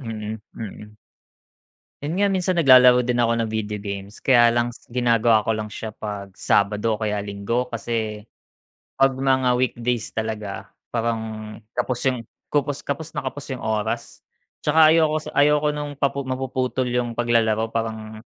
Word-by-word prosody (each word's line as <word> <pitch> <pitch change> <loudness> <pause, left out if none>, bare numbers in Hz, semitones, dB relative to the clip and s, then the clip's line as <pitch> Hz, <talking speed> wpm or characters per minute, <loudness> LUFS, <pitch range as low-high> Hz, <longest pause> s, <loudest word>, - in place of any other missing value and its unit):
Mm, 110 -3 -5 0.2
mm. 105 -1 -9 1.1
Yun 150 +3 -2
nga 200 +1 +2
minsan 185 -1 +1
naglalaro 125 -6 +7
din 120 0 0
ako 115 -1 +2
ng 110 - -3
video 105 -1 -2
games, 100 0 -7
kaya 120 -3 +5
lang 120 0 +1 0.2
ginagawa 115 -2 +3
ko 115 - -2
lang 110 -1 -1
siya 110 +1 -6
'pag 105 -2 -6
Sabado 105 +2 +2
o 105 - -7
kaya 105 -1 0
Linggo. 100 +5 -2
Kasi, 110 -2 -3 0.7
'pag 135 0 +4
mga 130 -2 +3
weekdays 120 -2 -1
talaga 110 -3 -4 0.2
parang 115 -1 0 0.6
kapos 120 0 -1
yung 130 -2 +1 0.3
kupus 145 -1 0
kapos 145 +3 -3
na - - 0
kapos 145 +1 -6
'yong - - -10
oras 110 0 -2 0.4
'tsaka 160 -1 +6
ayoko 160 -1 +3
s - - -10
ayoko 150 +1 +3
nung 145 0 -4
papu 140 0 +1
mapuputol 130 0 -1
'yong 120 -1 -1
paglalaro 115 -2 +2
parang 110 -1 -4
120 Hz, 150 wpm, -23 LUFS, 110-130 Hz, 1.1 s, naglalaro